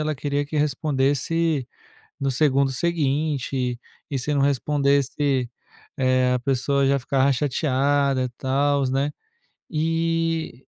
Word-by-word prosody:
ela 155 0 -1
queria 145 +1 -2
que 145 +2 -10
respondesse 145 0 0 0.5
no 135 -1 0
segundo 135 0 +2
seguinte, 140 -5 -1 0.3
e 140 - -2
se 145 +4 -2
não 140 - +2
respondesse, 140 -1 +1 0.5
eh, 130 -1 +2
a 125 - +1
pessoa 135 +1 +1
já 140 0 +3
ficava 135 +1 +1
chateada, 140 0 +1
e 125 - -2
tals, 135 +2 0
né. 140 +2 0 0.6
E, 165 -3 -1
140 Hz, 115 wpm, -23 LUFS, 130-150 Hz, 0.6 s, já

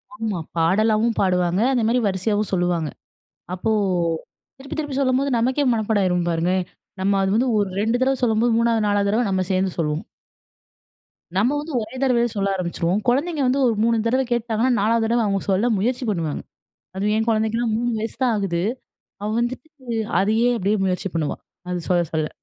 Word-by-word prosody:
ஆமா, 220 -7 -3 0.2
பாடலாவும் 215 +6 +2
பாடுவாங்க, 180 0 +2
அந்த 250 -3 +1
மாரி 245 +2 +2
வரிசையாவும் 205 +2 -1
சொல்லுவாங்க. 175 -4 0 0.7
அப்போ, 205 +5 -2 0.9
திருப்பி 275 +1 -8
திருப்பி 290 -3 -3
சொல்லும்போது 270 +1 +1
நமக்கே 260 +5 +1
மனப்பாடம் 220 -2 +1
ஆயிரும் 180 -1 +1
பாருங்க! 170 +2 0 0.5
நம்ம 195 +1 +2
அது 190 - +1
வந்து, 255 +3 +2
ஒரு 205 -1 +1
2 225 +3 +1
தடவ 265 0 +2
சொல்லும்போது, 230 0 +2
3வது 230 -2 +2
4வது 205 0 +1
தடவ 230 +2 +1
நம்ம 185 -1 +1
சேந்து 185 0 +1
சொல்லுவோம். 150 -1 -1 1.3
நம்ம 240 +9 +2
வந்து 300 +2 -6
ஒரே 220 +4 -8
தடவயே 240 -3 +3
சொல்ல 200 0 0
ஆரம்பிச்சுருவோம். 175 +1 -1
கொழந்தைங்க 290 +5 +1
வந்து, 260 +2 +2
ஒரு 230 - +2
3 230 0 +3
தடவ 255 +3 +2
கேட்டாங்கன்னா, 235 +1 0
4வது 225 +2 +2
தடவ 235 +1 +2
அவுங்க 195 -1 0
சொல்ல 210 +6 +2
முயற்சி 245 +5 -1
பண்ணுவாங்க. 165 -7 -2 0.6
அது 205 +2 0
என் 220 +1 0
கொழந்தைக்கெல்லாம் 220 +1 +1
3 240 +1 0
வயசு 225 +1 -5
தான் 245 -2 +3
ஆகுது. 180 -4 -1 0.6
அவ 210 - -2
வந்துட்டு, 250 +5 -3 0.5
அதையே, 220 +5 +2
அப்படியே 205 +1 +1
முயற்சி 185 +1 -1
பண்ணுவா. 160 -3 -1 0.3
அது 180 -1 -2
சொல்ல 175 -1 +4
சொல்ல. 155 -1 0
215 Hz, 165 wpm, -22 LUFS, 190-240 Hz, 1.3 s, சொல்ல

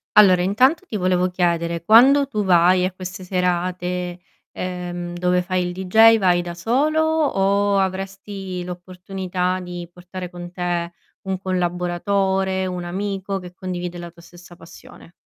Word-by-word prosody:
Allora, 185 -4 +7
intanto 255 - +2
ti 215 - -3
volevo 185 -1 +1
chiedere: 170 -2 -1
quando 265 +8 +6
tu 215 -6 -2
vai 180 0 +4
a 185 - -1
queste 185 +1 -8
serate, 180 -1 -2 0.3
ehm, 175 -1 -5
dove 180 0 +1
fai 180 -1 -1
il 180 - -5
deejay, 220 +5 +5
vai 180 -4 +2
da 175 0 -7
solo 275 - +1
o 205 -11 +1
avresti 195 -1 -4
l'opportunità 180 +1 -4
di 175 -1 -7
portare 180 +1 -8
con 175 -1 -9
te 175 -1 -2 0.4
un 190 0 -1
collaboratore, 190 +1 -1
un 180 -1 -4
amico 195 +2 -3
che 180 -1 -11
condivide 180 -1 -5
la 175 0 -7
tua 170 0 -18
stessa 175 0 -15
passione? 165 0 -15
180 Hz, 140 wpm, -21 LUFS, 175-195 Hz, 0.4 s, Allora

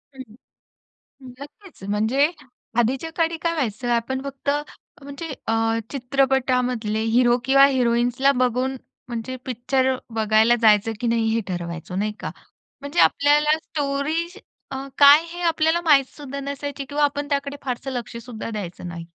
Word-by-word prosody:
हं. 260 - -8 1.2
नक्कीच, 295 - -13
म्हणजे 225 +8 +2 0.5
आधीच्या 260 +7 0
काळी 330 0 0
काय 335 0 0
व्हायचं, 245 -5 -2
आपण 240 +3 0
फक्त 275 0 -5 0.5
म्हणजे 280 +4 -7 0.2
अ, 225 - +1 0.4
चित्रपटामधले 250 -4 0 0.2
हिरो 240 -1 +4
किंवा 275 +1 +6
हिरोइन्सला 245 0 +2
बघून 255 0 0 0.3
म्हणजे 240 +1 -5
पिक्चर 260 +1 0 0.2
बघायला 220 +2 +4
जायचं, 215 0 +4
की 240 - -1
नाही 230 -1 +1
हे 230 - +1
ठरवायचो, 175 -1 -5
नाही 210 +2 -1
का? - - -5 0.5
म्हणजे 285 +5 -3
आपल्याला 295 +2 +4
स्टोरी 300 +2 -2 0.4
अ, - - -4 0.2
काय 290 +2 +8
हे 350 +1 -8
आपल्याला 325 +1 +2
माहीत 290 -5 +5
सुद्धा 280 -2 -6
नसायची 280 0 -5
किंवा 290 +2 -1
आपण 285 0 0
त्याकडे 280 0 -2
फारसं 255 +1 -3
लक्ष 240 -2 -5
सुद्धा 230 -2 -7
द्यायचो 205 -6 -6
नाही. 170 -1 -7
265 Hz, 140 wpm, -23 LUFS, 235-285 Hz, 1.2 s, काय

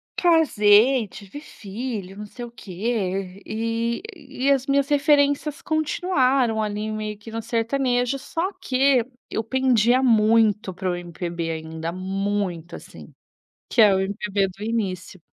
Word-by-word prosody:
casei, 250 - +4
tive 205 +9 -10
filho, 205 -5 -7
não 210 - -6
sei 240 +3 -8
o 235 - -11
que, 195 -2 -3
e 230 +3 -2
e 275 -3 -2
as 270 -1 +2
minhas 275 0 +2
referências 290 0 +2
continuaram, 275 - +1
ali, 210 0 -3
meio 215 -1 -4
que 210 +2 -12
no 225 0 -4
sertanejo, 245 +3 0
só 335 +7 -3
que 260 -4 +3 0.3
eu 220 - -2
pendia 250 0 +2
muito 220 -3 +3
para 185 0 -2
o - - -2
MPB 170 -1 -5
ainda, 160 +1 -5
muito, 190 -2 -3
assim. - - -12 0.6
Que 230 - +3
é 205 -2 +7
o 190 - +2
MPB 200 0 -1
do 195 +2 -10
início. 195 -5 -3
225 Hz, 135 wpm, -23 LUFS, 195-260 Hz, 0.6 s, é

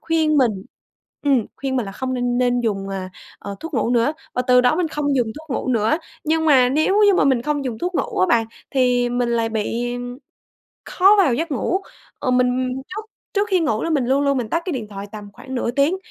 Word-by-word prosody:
khuyên 315 -2 +1
mình 255 -4 +4 0.7
ừm, 270 -6 +2
khuyên 265 -1 -2
mình 235 -5 -1
là 195 - -7
không 260 +3 -3
n 245 0 0
nên 245 -1 +2
dùng, 195 -4 -2
à, 190 -1 -5 0.3
ờ, 200 0 -7
thuốc 325 -2 -7
ngủ 230 +1 +1
nữa, 245 +5 +2 0.2
và 250 - 0
từ 250 -1 +5
đó 250 +5 +3
mình 350 -3 0
không 290 -3 -1
dùng 245 -3 +2
thuốc 315 - -17
ngủ - - -4
nữa. 230 +5 +2 0.3
Nhưng 320 +1 +1
mà 255 -4 +5
nếu 315 +10 +2
như 400 - +5
mà - - +3
mình 260 -4 +2
không 290 -1 -1
dùng 230 -4 -4
thuốc 360 +1 -3
ngủ - - -2
á 185 - +4
bạn, 230 -2 +2 0.2
thì 250 -2 +2
mình 245 0 0
lại 230 -1 +1
bị 235 +3 -2 0.9
khó 390 +3 +5
vào 340 -11 +4
giấc 325 +5 -2
ngủ. 320 +8 0 0.4
Ừ, 255 - -1
mình 250 0 +2 0.2
trước 430 +3 -7 0.3
trước 410 +1 0
khi 375 -2 +3
ngủ 260 -10 0
là 330 - -1
mình 280 -6 +1
luôn 270 +3 +2
luôn 280 -1 +2
mình 230 -3 -3
tắt 335 - 0
cái 355 - -2
điện 225 -5 -4
thoại 200 0 -7
tầm 210 -1 -9
khoảng 260 -1 -8
nửa 240 -1 -1
tiếng, 285 +8 +2
255 Hz, 235 wpm, -21 LUFS, 235-305 Hz, 0.9 s, từ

